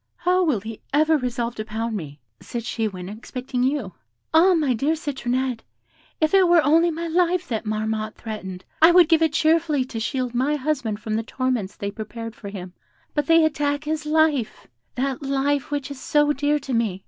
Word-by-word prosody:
'How 365 +1 +2
will 285 - +1
he 220 +1 -8
ever 310 +2 +4
resolve 240 -3 -2
to 215 - -5
pound 220 +1 -3
me?' 150 -6 -7 0.2
said 235 -1 -6
she 225 -2 -1
when 185 -3 -7
expecting 245 +4 -5
you. 255 -7 0 0.4
'Ah, 355 +3 +6
my 295 -6 +2
dear 280 +8 +1
Citronette, 260 -5 -2 0.6
if 310 +2 +1
it 380 -2 +6
were 340 -2 +5
only 330 +4 +4
my 335 +1 -4
life 350 +1 +1
that 225 -2 -3
Marmotte 215 0 -2
threatened, 190 -5 -7 0.2
I 325 - +9
would 350 -2 +7
give 325 -1 +4
it 320 -2 +3
cheerfully 315 -4 +2
to 235 -3 -6
shield 250 +1 -2
my 265 +5 +1
husband 260 -7 -2
from 215 0 -4
the - - 0
torments 250 -4 -2
they 200 0 -4
prepared 225 +2 -7
for 200 - -8
him; 185 -3 -8 0.4
but 295 -2 -1
they 330 -1 +6
attack 290 -1 0
his 305 0 -3
life 305 -6 +1 0.3
that 265 +1 -2
life 275 0 0
which 290 -1 -3
is 275 - -8
so 295 0 +2
dear 290 +1 +1
to 270 -3 -5
me. 220 -5 0
265 Hz, 195 wpm, -23 LUFS, 225-310 Hz, 0.6 s, I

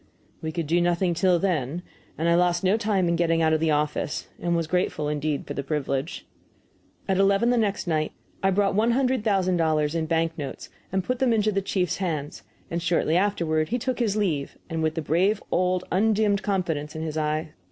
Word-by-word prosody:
We 160 - -3
could 165 0 -3
do 170 +4 +2
nothing 175 +1 +1
till 175 +1 +3
then, 170 -3 -1 0.3
and 165 - 0
I 170 - +4
lost 175 0 +2
no 190 +2 +4
time 205 -5 +1
in 170 - +2
getting 165 -1 +2
out 160 0 +3
of 155 - +2
the 160 0 +1
office, 150 -1 -1
and 170 0 0
was 165 -1 0
grateful 160 -3 -1
indeed 150 -1 -2
for - - -5
the - - -3
privilege. 140 +1 -3 0.8
At 190 -1 +1
eleven 200 +4 +3
the 245 - +2
next 205 -3 0
night 155 -3 0 0.3
I 195 - +3
brought 195 +1 +2
one 225 +4 +2
hundred 260 -2 +1
thousand 190 -4 +2
dollars 155 -2 +1
in 165 -1 -1
bank 165 0 0
notes 140 -2 -6 0.2
and 190 0 0
put 250 +5 -2
them 260 -2 +3
into 215 -1 +2
the 195 -1 0
chief's 185 -2 -1
hands, 150 - -3 0.3
and 170 +1 -1
shortly 165 -1 +1
afterward 170 -5 +1
he 245 - 0
took 255 +1 -2
his 215 -4 +1
leave, 160 -10 -1
with 160 -1 -1
the 160 - -2
brave 185 +8 +1
old 180 0 +1
undimmed 210 +1 +2
confidence 165 -8 -2
in 160 - -4
his 155 -1 -4
eye. 155 +1 -1
175 Hz, 205 wpm, -25 LUFS, 155-195 Hz, 0.8 s, I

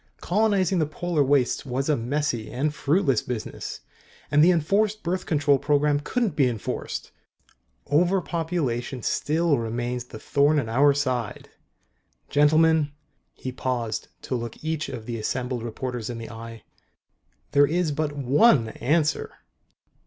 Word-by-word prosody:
Colonizing 195 -2 +2
the 155 - +1
Polar 165 -1 0
Wastes 135 -2 +2
was 135 0 -2
a 150 - +3
messy 120 -2 -2
and 145 +4 -1
fruitless 140 - +2
business. 120 -3 -6 0.5
And 150 0 +5
the 175 - +6
Enforced 200 +6 +1
Birth 180 +2 -2
Control 145 -3 +3
Program 145 0 +2
couldn't 220 +8 -1
be 135 -4 +4
enforced. 115 -4 -4 0.7
Overpopulation 160 - 0
still 155 -1 +1
remains 120 +2 -3
the 120 - -10
thorn 145 +6 +2
in 135 -6 0
our 140 +5 +4
side. 130 -6 -2 0.8
Gentlemen 155 +1 +4 0.2
" - - -46
He 130 - -5
paused 125 -3 -3 0.2
to - - -4
look 120 0 -4
each 160 -1 -2
of 115 -4 -7
the 115 -1 -4
assembled 125 +2 -2
reporters 120 0 -4
in 120 - -4
the 115 0 -7
eye. 115 0 -9 0.4
" - - -44
there 145 0 +5
is 170 0 0
but 150 0 -1
one 140 - +4
answer." 150 +5 0
145 Hz, 140 wpm, -25 LUFS, 125-160 Hz, 0.8 s, the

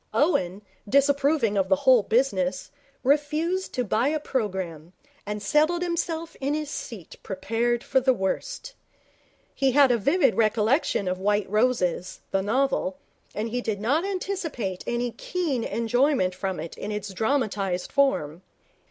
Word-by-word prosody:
Owen, 200 - +1 0.3
disapproving 280 -4 +3
of 190 -1 0
the 190 - +5
whole 250 +4 +5
business, 200 -6 0 0.3
refused 305 +7 +1
to 250 - +1
buy 225 +3 +1
a 310 +1 0
programme, 185 - -3 0.3
and 210 0 -4
settled 310 - +2
himself 335 -1 -3
in 280 +2 0
his 305 -1 -4
seat 210 - -7
prepared 230 +5 -1
for 265 - +2
the 260 +1 +3
worst. - - -3 0.8
He 270 -2 +1
had 275 -2 +6
a 235 - +2
vivid 280 - +3
recollection 220 - +1
of 185 0 -1
White 205 +1 +1
Roses, 205 -5 0
the 195 - +1
novel, 220 -3 0 0.4
and 215 +2 -2
he 245 +2 -2
did 215 -4 -2
not 275 +10 +1
anticipate 365 - -3
any 240 0 -1
keen 300 -5 -2
enjoyment 235 -3 +1
from 185 -2 -3
it 165 +1 -6
in 210 - -4
its 205 -2 -4
dramatized 205 -5 -1
form. 225 - +1
235 Hz, 145 wpm, -25 LUFS, 195-285 Hz, 0.8 s, had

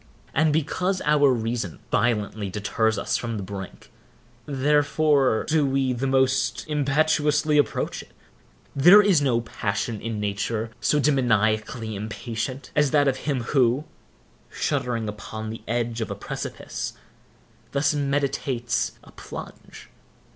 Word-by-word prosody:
And 155 0 +3
because 180 +5 0
our 145 -2 +4
reason 115 -6 -2
violently 105 -3 0
deters 110 +2 0
us 100 - 0
from 115 -2 -4
the 100 - -4
brink, 95 -1 -8 0.6
therefore 145 -2 +2
do 155 -1 +3
we 135 -1 +1
the 130 +3 -2
most 130 0 +1
impetuously 150 0 +2
approach 145 - -1
it. - - -17 0.6
There 180 +9 +8
is 190 -7 +4
no 125 -4 +2
passion 110 -1 -3
in 115 -1 -3
nature 105 +2 -2
so 150 - +2
demoniacally 110 -5 +1
impatient, 115 +5 -5
as 150 -1 +3
that 145 0 +3
of 135 -1 +1
him 135 -2 -2
who, 130 +1 +2 0.7
shuddering 115 -3 -1
upon 110 +1 -6
the 115 - -8
edge 115 0 -1
of 110 - -3
a - - -3
precipice, - - -5 0.8
thus 140 +2 +2
meditates 140 -4 -1
a - - -16
plunge. - - -10
130 Hz, 125 wpm, -24 LUFS, 110-145 Hz, 0.8 s, There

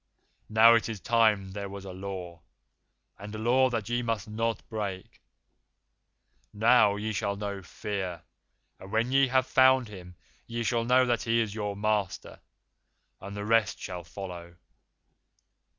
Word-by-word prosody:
Now 110 +2 +7
it 115 0 +2
is 110 -3 -5
time 110 -4 +2
there 100 0 -5
was 100 0 -8
a 95 - -7
Law, 90 -3 -7 0.8
and 105 +2 -8
a - - -4
Law 125 +4 +3
that 115 -4 -3
ye 120 +1 0
must 115 -2 -2
not 115 +1 -3
break. 100 -4 -6 1.3
Now 110 -1 +4
ye 110 +1 -3
shall 100 0 -1
know 100 -1 -5
Fear, 95 -1 -5 0.6
and 95 - -11
when 115 +3 0
ye 135 0 +4
have 130 0 +2
found 130 -3 +4
him 90 -3 -11 0.3
ye 115 0 -3
shall 115 0 0
know 130 +1 +4
that 120 -2 0
he 115 0 +1
is 110 -3 -1
your 105 -2 -3
master, 105 -2 -2 0.8
and 100 +1 -8
the 100 - -4
rest 115 -2 +2
shall 90 -1 -6
follow. 85 -1 -9
105 Hz, 150 wpm, -28 LUFS, 100-115 Hz, 1.3 s, Now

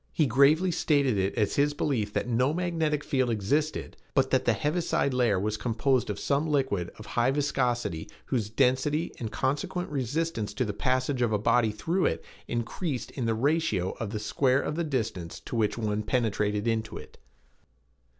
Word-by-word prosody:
He 155 - +2
gravely 140 +8 +4
stated 140 -7 +2
it 95 +1 0
as 105 -4 0
his 145 +1 +2
belief 115 -9 0
that - - -1
no 125 +5 +2
magnetic 165 -4 0
field 130 -4 +1
existed, 140 +9 -1 0.2
but - - +3
that - - +2
the - - +4
heaviside 150 -3 0
layer 120 -6 +2
was 105 +2 -1
composed 120 +2 +1
of 105 - -2
some 145 +6 0
liquid 130 - 0
of 110 - -10
high 120 +1 +1
viscosity 125 - -1 0.2
whose 110 -5 -1
density 135 +7 +1
and 110 -3 -4
consequent 175 +6 -2
resistance 135 -5 -2
to 125 - 0
the 105 - -3
passage 130 +3 0
of 120 -2 +2
a 105 - +2
body 110 +2 +3
through 165 - 0
it - - -3 0.2
increased 125 +4 -3
in 120 -3 -3
the 115 - +1
ratio 115 - +1
of 110 - -3
the 110 - -3
square 130 +5 +2
of 150 - -2
the 170 - 0
distance 110 - -3
to - - -6
which 110 -1 +1
one 105 -2 -1
penetrated 105 -2 0
into 110 -1 -1
it. - - -12
125 Hz, 180 wpm, -28 LUFS, 110-145 Hz, 0.2 s, gravely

